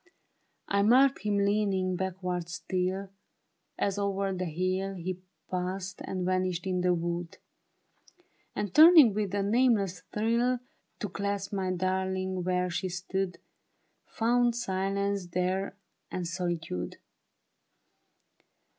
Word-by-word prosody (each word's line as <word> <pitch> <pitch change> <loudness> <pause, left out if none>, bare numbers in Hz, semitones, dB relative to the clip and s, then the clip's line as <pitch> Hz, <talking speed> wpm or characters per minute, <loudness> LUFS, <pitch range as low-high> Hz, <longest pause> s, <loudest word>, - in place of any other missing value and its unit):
I 200 0 +2
marked 255 +6 +5
him 205 -1 0
leaning 200 -2 +1
backward 180 -2 -3
still. 185 +2 -2 0.7
As 200 0 0
o'er 195 -1 0
the 185 0 -2
hill 185 +4 -1
He 180 +1 -4 0.3
passed 185 +1 -3
and 185 -1 -3
vanished 185 -1 0
in 185 -1 0
the 180 0 +3
wood; 170 0 -3 1.2
And 205 -3 -3
turning 315 - +9
with 205 -2 -1
a 200 - +1
nameless 205 -5 +2
thrill 235 +4 +1 0.4
To 210 - -1
clasp 200 +1 -3
my 190 -2 -1
darling 185 0 -1
where 180 0 0
she 185 +3 -2
stood. 190 0 -3 0.7
Found 240 +1 +2
silence 195 -2 -1
there 185 +3 -1 0.3
and 180 -2 -3
solitude. 170 - -3
190 Hz, 110 wpm, -29 LUFS, 180-200 Hz, 1.2 s, turning